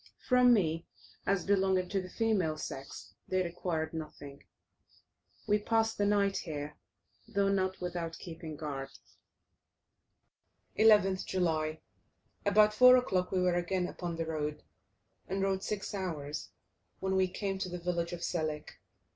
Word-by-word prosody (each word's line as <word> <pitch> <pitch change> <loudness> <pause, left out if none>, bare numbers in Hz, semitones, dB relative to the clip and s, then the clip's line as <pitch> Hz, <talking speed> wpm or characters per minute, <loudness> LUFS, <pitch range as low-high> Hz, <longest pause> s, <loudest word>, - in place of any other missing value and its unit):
From 250 -1 +6
me, 165 -7 +2 0.4
as 195 -2 +1
belonging 190 -2 +2
to 195 -1 0
the 185 - -9
female 195 -10 +1
sex, 135 -9 -7
they 185 0 +1
required 170 -2 -3
nothing. 150 -3 -8 1.0
We 210 0 +3
passed 225 +1 +1
the 205 - +3
night 200 -1 +2
here, 150 -2 -5 0.5
though 200 0 +1
not 190 -1 0
without 175 -2 -4
keeping 165 -2 -8
guard. 140 -3 -5 1.9
11th 205 -4 +5
July. 160 -4 0 0.7
About 210 +1 +5
4 250 +3 +8
o'clock 185 -7 0
we 185 -1 +1
were 180 -1 +3
again 180 +1 0
upon 175 -2 -5
the 165 0 -2
road, 150 -2 -3 0.6
and 195 +1 -1
rode 190 -1 +1
six 210 0 -4
hours, 160 -6 -4 0.5
when 190 0 -1
we 190 0 +3
came 195 +1 -3
to 185 - -2
the 180 - -4
village 170 -1 -2
of 175 -1 -6
Selik. 155 -4 -3
180 Hz, 140 wpm, -32 LUFS, 160-195 Hz, 1.9 s, 4